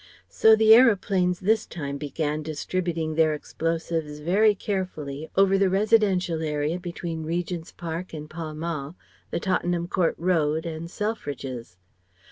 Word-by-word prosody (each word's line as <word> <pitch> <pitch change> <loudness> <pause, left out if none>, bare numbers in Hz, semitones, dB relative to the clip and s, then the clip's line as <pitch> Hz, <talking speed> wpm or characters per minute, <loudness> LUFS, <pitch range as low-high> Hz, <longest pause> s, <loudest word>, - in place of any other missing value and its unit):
So 220 0 +6
the 220 0 +7
aeroplanes 195 -6 +4
this 215 +3 +2
time 140 -4 -5
began 150 +1 -2
distributing 160 +1 -2
their 155 -1 +3
explosives 160 -1 -3
very 200 +8 +3
carefully 160 -8 -4
over 195 0 +4
the 195 -1 +3
residential 195 -4 +2
area 150 +2 -1
between 170 -2 -5
Regent's 170 +1 -3
Park 170 +2 -6
and 155 -1 -7
Pall 155 -1 -6
Mall, 155 -1 -4 0.3
the - - -2
Tottenham 175 -1 0
Court 180 -2 +1
Road 160 -3 +1
and 165 0 -5
Selfridge's. 140 - -5
170 Hz, 130 wpm, -25 LUFS, 155-185 Hz, 0.3 s, the